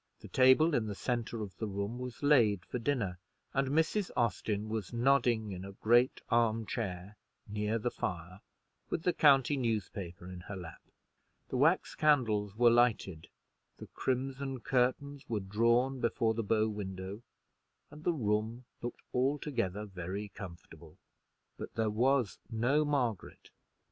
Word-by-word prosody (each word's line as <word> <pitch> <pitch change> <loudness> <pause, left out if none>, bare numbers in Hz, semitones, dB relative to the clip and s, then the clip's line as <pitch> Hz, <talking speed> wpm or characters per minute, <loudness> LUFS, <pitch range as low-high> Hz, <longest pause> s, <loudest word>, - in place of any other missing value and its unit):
The - - -10
table 130 +5 +5
in 115 -5 +1
the 105 - -4
centre 115 -1 -2
of 100 -2 -8
the 110 - -3
room 100 +4 -3
was 125 +1 -7
laid 115 - +4
for 125 - -4
dinner, 115 -8 -1 0.3
and 135 0 +1
Mrs. 160 +7 +1
Austin 110 -3 0
was 110 -3 -4
nodding 120 -3 +2
in 90 -1 -6
a 100 0 -8
great 120 +5 +3
arm 115 -1 +2
chair 100 -4 -5 0.3
near 105 +1 -1
the 120 +2 -2
fire, 90 +1 -5 0.5
with - - -2
the 180 - +2
county 140 -2 +5
newspaper 100 -7 -3
in 90 -1 -8
her 95 +3 -8
lap. 90 -3 -9 0.7
The 130 - -2
wax 160 +7 +3
candles 110 -9 +2
were 120 +1 +5
lighted, 115 -9 +2 0.5
the - - -9
crimson 135 0 -2
curtains 135 +3 0
were 110 -3 0
drawn 115 +7 +2
before 115 -1 +1
the 115 - -1
bow 110 +1 +2
window, 100 -1 -5 0.7
and 150 +1 -12
the 175 - +2
room 110 -3 -1 0.2
looked 120 - -6
altogether 125 -7 -1
very 95 +1 -5
comfortable: 85 -5 -11 0.6
but - - -7
there 110 -2 +1
was 125 0 +1
no 125 +6 +2
Margaret. 130 -9 -2
115 Hz, 145 wpm, -32 LUFS, 100-130 Hz, 0.7 s, table